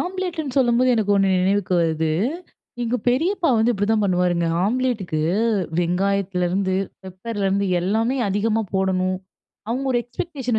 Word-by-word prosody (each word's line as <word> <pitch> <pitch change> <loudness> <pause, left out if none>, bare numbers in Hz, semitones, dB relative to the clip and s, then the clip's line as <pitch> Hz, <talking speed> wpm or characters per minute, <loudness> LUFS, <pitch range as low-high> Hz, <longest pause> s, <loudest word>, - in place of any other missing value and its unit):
ஆம்லேட்டுன்னு 355 -7 -3
சொல்லும்போது 250 0 +3
எனக்கு 210 -3 +1
ஒண்ணு 195 -1 +3
நினைவுக்கு 195 -1 +1
வருது. 160 -1 0 0.7
எங்க 240 +1 0
பெரியப்பா 335 +8 +1
வந்து 225 +2 +3
இப்படிதான் 210 +1 +1
பண்ணுவாருங்க. 180 -2 +1 0.2
ஆம்லேட்டுக்கு 220 -7 -1 0.6
வெங்காயத்திலேருந்து, 185 +1 0 0.3
பெப்பர்லேருந்து 195 +1 -2
எல்லாமே 225 +8 0
அதிகமா 215 +3 0
போடணும். 185 -1 +1 0.5
அவங்க 255 +4 -2
ஒரு 240 - +2
எக்ஸ்பெக்டேஷன் 250 -3 -3
205 Hz, 115 wpm, -22 LUFS, 185-245 Hz, 0.7 s, சொல்லும்போது